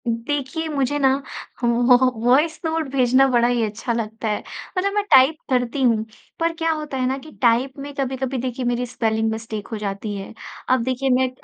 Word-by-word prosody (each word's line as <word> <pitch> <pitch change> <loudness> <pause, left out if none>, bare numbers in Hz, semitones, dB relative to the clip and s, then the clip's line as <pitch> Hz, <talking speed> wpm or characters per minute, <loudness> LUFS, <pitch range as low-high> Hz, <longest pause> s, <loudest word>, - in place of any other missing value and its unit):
देखिए, 275 +7 -2
मुझे 290 -2 0
ना 265 -1 +4 0.5
व - - +3 0.2
वॉ 250 - +9 0.2
वॉइस 290 +7 +3
नोट 320 -1 -1
भेजना 260 0 +4
बड़ा 240 -1 +4
ही 240 -1 +1
अच्छा 220 +3 -2
लगता 225 -1 -3
है। 210 -1 0 0.4
मतलब 395 +2 +1
मैं 415 0 +1
टाइप 265 +4 +7
करती 250 +1 0
हूँ, 225 -3 +2 0.3
पर 330 0 +1
क्या 325 0 +1
होता 300 -3 -4
है 255 - 0
ना 265 +1 -1
कि 310 +3 -12
टाइप 245 +2 +3
में 285 +1 -7
कभी-कभी 265 -1 -2
देखिए 255 0 -3
मेरी 245 +1 0
स्पेलिंग 225 -2 0
मिस्टेक 220 -2 -5
हो 220 - -3
जाती 205 0 -4
है। 195 +2 -7 0.4
अब 255 -2 +3
देखिए, 260 +2 -1
मैं 255 0 +3
255 Hz, 195 wpm, -22 LUFS, 230-275 Hz, 0.5 s, वॉ